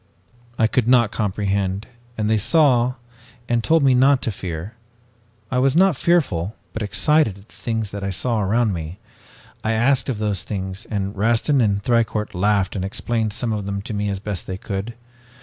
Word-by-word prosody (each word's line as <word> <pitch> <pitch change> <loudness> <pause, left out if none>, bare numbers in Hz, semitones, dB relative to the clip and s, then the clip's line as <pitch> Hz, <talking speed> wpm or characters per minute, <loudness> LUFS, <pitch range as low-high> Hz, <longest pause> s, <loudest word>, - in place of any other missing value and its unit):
"I 110 - +3
could 115 +1 +1
not 120 -4 +4
comprehend, 100 -1 -1 0.3
and 105 -1 0
they 110 0 +2
saw 125 - +3 0.5
and 120 -1 +1
told 165 -2 +3
me 135 -2 +5
not 135 +2 +5
to 115 - 0
fear. 90 +1 -6 0.8
I 125 - +1
was 135 +2 +2
not 190 -1 +5
fearful, 120 - +1 0.2
but 110 - -4
excited 130 +1 +2
at 100 +2 -18
the - - -17
things 110 -3 -3
that 100 -1 -6
I 100 - -1
saw 110 +4 -1
around 110 +2 +1
me. 80 +1 -6 0.7
I 110 - +1
asked 130 +5 +2
of 125 - -1
those 105 -3 -1
things 95 0 -5
and 100 -1 -2
Rastin 115 +7 +2
and 100 -3 +1
Thicourt 110 -3 0
laughed 100 +1 +1
and 95 - -2
explained 110 +3 -1
some 115 +2 -2
of 105 -2 -3
them 100 0 -2
to 110 - -6
me 105 0 -1
as 100 - -2
best 100 -3 -5
they 95 - -4
could. 100 +4 -5
110 Hz, 185 wpm, -21 LUFS, 100-120 Hz, 0.8 s, me